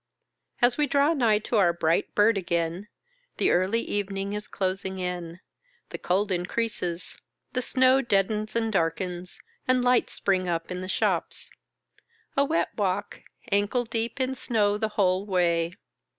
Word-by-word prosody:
As 245 +3 +4
we 295 - +3
draw 285 +3 +3
nigh 235 -8 +3
to 220 +2 -1
our 175 -4 +4
bright 165 -1 0
bird 210 +2 +5
again, 170 +1 -2 0.5
the - - +3
early 190 +6 +2
evening 200 0 -3
is 210 0 -4
closing 190 0 -2
in, 180 -1 -5 0.5
the - - -6
cold 195 +3 0
increases, 180 -1 -2 0.4
the 255 - 0
snow 260 +1 +3
deadens 215 -1 0
and 225 -1 0
darkens, 180 +1 -2 0.3
and 255 -1 +3
lights 250 0 +2
spring 185 -2 0
up 165 +1 -2
in 180 0 -4
the 185 - -5
shops. - - -1 0.8
A 275 - +4
wet 310 +4 0
walk,, 200 0 -2 0.3
ankle 205 +5 +1
deep 230 +3 -3
in 260 0 0
snow 215 -5 +1
the 215 +1 -1
whole 185 -1 +2
way. 170 -2 +1
200 Hz, 150 wpm, -26 LUFS, 180-230 Hz, 0.8 s, bird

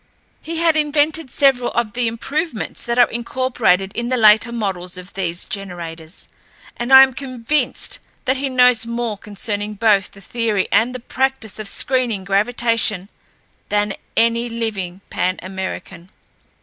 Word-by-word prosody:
He 330 +1 -5
had 330 -1 +3
invented 300 0 +1
several 255 -2 +3
of 220 -3 -1
the 240 -1 0
improvements 270 +3 -3
that 235 0 0
are 245 - +7
incorporated 235 -6 0
in 235 +1 -3
the 255 - +1
later 220 +1 +6
models 190 -6 -3
of 185 +1 -11
these 175 -2 -2
generators, 170 -4 -7 0.5
and 240 +2 -4
I 265 0 +11
am 265 -1 +1
convinced 260 +2 -2 0.3
that 260 0 +1
he 275 +1 -2
knows 250 -3 +4
more 235 -2 -2
concerning 205 0 -4
both 205 -2 +3
the 200 - -15
theory 215 -1 -1
and 245 +3 +2
the - - -4
practice 260 -3 -2
of 215 - -5
screening 240 -3 0
gravitation 210 -1 0 0.6
than 205 -1 +1 0.2
any 230 +1 +2
living 200 -6 -4
Pan 185 +1 0
American. 190 -1 -6
230 Hz, 145 wpm, -19 LUFS, 195-255 Hz, 0.6 s, I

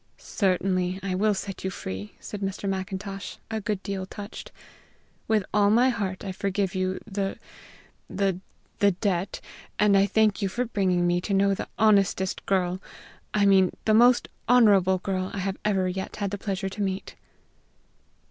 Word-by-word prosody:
"Certainly 185 -2 0
I 195 -1 -2
will 210 +3 +2
set 195 0 -6
you 190 - -1
free," 100 - -6
said 205 - -7
Mr. 195 +1 -3
Macintosh, 195 +1 -4 0.2
a 220 0 -2
good 205 -1 -2
deal 190 -2 -4
touched. 205 +1 -8 0.8
"With 215 -3 +2
all 205 -1 +4
my 240 +5 +5
heart 205 -6 -3
I 190 - -3
forgive 195 0 -1
you 185 0 -1
the 195 -2 -3 0.7
the 195 -2 0 0.4
the 200 -1 +4
debt, 190 0 -2 0.4
and 210 -1 +4
I 195 0 +5
thank 215 +1 +2
you 195 - 0
for 245 +6 -1
bringing 185 -6 +1
me 175 0 +2
to 200 +1 -1
know 200 0 +3
the - - -4
honestest 200 -3 +2
girl 185 -1 +1 0.5
I 205 -1 +4
mean, 190 -2 +4
the 215 - +3
most 240 +2 +5 0.2
honorable 200 -7 +5
girl 185 0 -2
I - - -4
have 190 0 -2
ever 195 -3 +1
yet 190 +1 -4
had 200 -2 -2
the 205 - -4
pleasure 195 -1 -2
to 205 +2 -6
meet." 195 -1 -3
195 Hz, 165 wpm, -26 LUFS, 185-205 Hz, 0.8 s, my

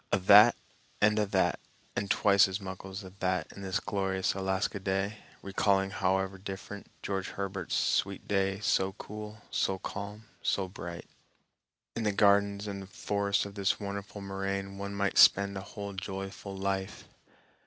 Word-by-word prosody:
A' - - +4
that 105 +4 +8 0.4
and 105 +1 +4
a' 105 - +1
that - - +1 0.4
and 100 0 -2
twice 100 -2 +5
as 95 +1 -3
muckle's 95 +1 -7
a' 95 - -10
that 90 -3 0
in 100 - -10
this 95 -1 -1
glorious 95 -2 -1
Alaska 95 +1 -1
day, 95 +2 -1 0.2
recalling, 95 0 +1
however 95 -1 0
different, 100 +1 -7 0.2
George 95 -1 -2
Herbert's 95 -3 -3
"Sweet 100 0 0
day, 95 -1 +1
so 95 -3 +2
cool, 105 +1 -9
so 95 - +1
calm, 100 +3 -6 0.2
so 95 -2 0
bright." 85 -2 -7 0.9
In 115 - -2
the 105 -2 +2
gardens 100 0 +3
and 100 -2 -6
forests 100 0 0
of 100 - -8
this 100 -1 0
wonderful 100 0 -5
moraine 95 0 -3
one 100 0 -4
might 100 -1 +1
spend 100 0 +6
a 95 - -4
whole 100 +1 -7
joyful 95 0 -6
life. 95 0 -2
100 Hz, 155 wpm, -30 LUFS, 95-100 Hz, 0.9 s, that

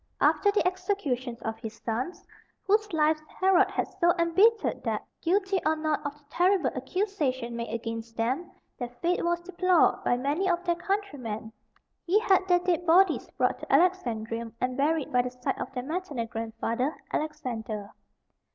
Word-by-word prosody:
After 405 - +4
the 405 - +2
execution 360 -10 -1
of 225 0 -3
his 225 -1 -7
sons, 245 +10 -4 0.4
whose 420 +1 +2
lives 310 -1 +2 0.2
Herod 375 -1 +5
had - - -1
so 345 -1 +5
embittered 390 +7 +3
that, - - -2 0.2
guilty 385 +2 +1
or 315 +1 +2
not 310 -1 -1
of 285 +1 -4
the 295 - -26
terrible 355 -3 +2
accusation 260 - -2
made 235 -1 -4
against 230 0 -5
them, 255 +10 -1 0.3
their 245 -2 -3
fate 355 +1 +1
was 345 0 +1
deplored 365 -1 +2
by 245 - +2
many 295 +9 0
of 350 0 +1
their 345 -1 +2
countrymen, 290 - -3 0.5
he 365 +4 +3
had 380 -3 +3
their 355 -1 +5
dead 355 -1 0
bodies 355 +1 +4
brought - - +1
to - - -8
Alexandrium, 235 -11 +1
and 250 0 -1
buried 295 +1 0
by 250 - +5
the 250 - -3
side 250 0 -3
of - - -4
their 250 -2 -3
maternal 300 -5 -3
grandfather, 230 +4 -2 0.2
Alexander. 230 -9 -3
310 Hz, 160 wpm, -28 LUFS, 245-365 Hz, 0.5 s, Herod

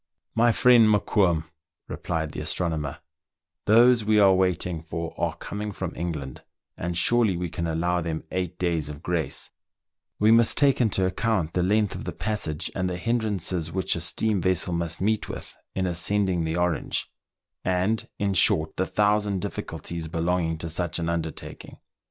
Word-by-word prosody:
" - - -50
My 120 - +6
friend 120 -1 +6
Mokoum," 95 -5 +2 0.4
replied 80 -3 -3
the - - -6
astronomer, 75 -2 -2 0.3
" - - -64
those 120 +2 +6
we 105 0 +3
are 100 -2 +6
waiting 90 -3 0
for 80 +1 -5
are - - -1
coming 105 +1 -5
from 95 -3 -5
England, 75 -6 -5 0.3
and 85 0 -3
surely 110 0 +3
we 90 0 -3
can 85 -1 -3
allow 85 +2 0
them 80 -1 -3
eight 90 -1 -3
days 85 -5 -1
of 75 0 -9
grace: 85 -5 -1 0.7
we 105 +1 +4
must 115 0 +5
take 140 -3 +4
into 100 -5 +2
account 95 -4 0
the 90 - +1
length 105 +3 +2
of - - -7
the - - -4
passage, 95 -7 -2
and 95 -1 -1
the 90 - -3
hindrances 100 -6 -1
which 95 +1 0
a 85 - -3
steam 100 +4 0
vessel 90 0 +1
must 85 0 -2
meet 110 +2 0
with - - -7 0.2
in 95 - 0
ascending 90 0 0
the 80 0 -2
Orange; 90 -3 -1 0.6
and, 95 +4 0
in 100 -1 0
short, 80 -3 +3
the 95 - 0
thousand 105 -1 +1
difficulties 85 -1 -5
belonging 85 0 -1
to 80 - -4
such 85 +1 -2
an 85 -1 -2
undertaking. 80 -2 -5
90 Hz, 170 wpm, -25 LUFS, 85-105 Hz, 0.7 s, My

